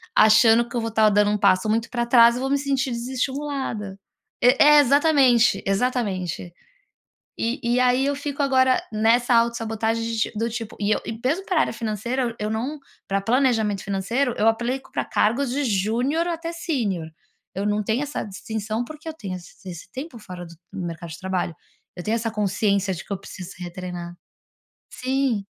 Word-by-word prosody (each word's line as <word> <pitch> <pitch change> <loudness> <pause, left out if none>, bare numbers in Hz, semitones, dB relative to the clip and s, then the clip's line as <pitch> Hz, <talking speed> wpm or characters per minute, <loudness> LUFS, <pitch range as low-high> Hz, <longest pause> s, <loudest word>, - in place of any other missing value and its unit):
achando 225 +2 +6
que - - -8
eu 235 - 0
vou 225 0 -3
tá 220 -1 +4
dando 205 0 +3
um 210 - +1
passo 200 +1 +3
muito 225 +2 0
para 240 -1 -1
trás 235 -1 +6
e - - -3
vou 270 +1 -2
me 280 - +2
sentir 275 -2 -1
desestimulada. 255 -4 -3 0.4
E 250 +2 +6
é 295 0 +8
exatamente, 275 -6 +4
exatamente. 195 -5 -1 0.9
E 235 +4 -1
e 240 +1 +2
aí, 255 +1 +3
eu 285 +1 +1
fico 285 0 -3
agora 260 -2 +3
nessa 230 +3 +3
autossabotagem 230 -1 +1
de 230 0 -3
ti - - 0
do 230 +2 -1
tipo, 225 -1 -6
e 205 0 0
eu 215 - +2
e 225 - -5
mesmo 330 +9 0
para 345 -5 +2
área - - +1
financeira 230 +4 -2
eu 235 -2 -2
eu 210 0 -2
não, 255 +8 -3 0.3
para 195 0 0
planejamento 225 -4 +1
financeiro 225 +7 -1
eu 215 - +1
aplico 240 +4 -1
pra - - -1
cargos 240 +4 +1
de 285 +2 -1
júnior 240 - 0
até 335 -1 -3
sênior. 230 - -2 0.5
Eu 195 +2 -2
não 210 0 +1
tenho 225 +6 0
essa 295 0 -3
distinção 220 +2 -4
porque 310 +4 -10
eu 315 - -5
tenho 195 -10 -6
esse 190 +3 -15
esse 175 +1 -10
tempo 270 -1 -7
fora 180 -4 -9
do 170 - -12 0.2
do 185 - -5
mercado 170 0 -6
de 160 - -8
trabalho, 185 -2 -2 0.4
eu 175 - -6
tenho 220 +4 0
essa 225 0 -2
consciência 200 -1 0
de 175 - -5
que - - -7
eu 195 - -2
preciso 190 -1 -9
ser 185 - -12
retreinada. 175 -1 -7 0.8
Sim. 255 -5 -1
230 Hz, 190 wpm, -23 LUFS, 200-260 Hz, 0.9 s, é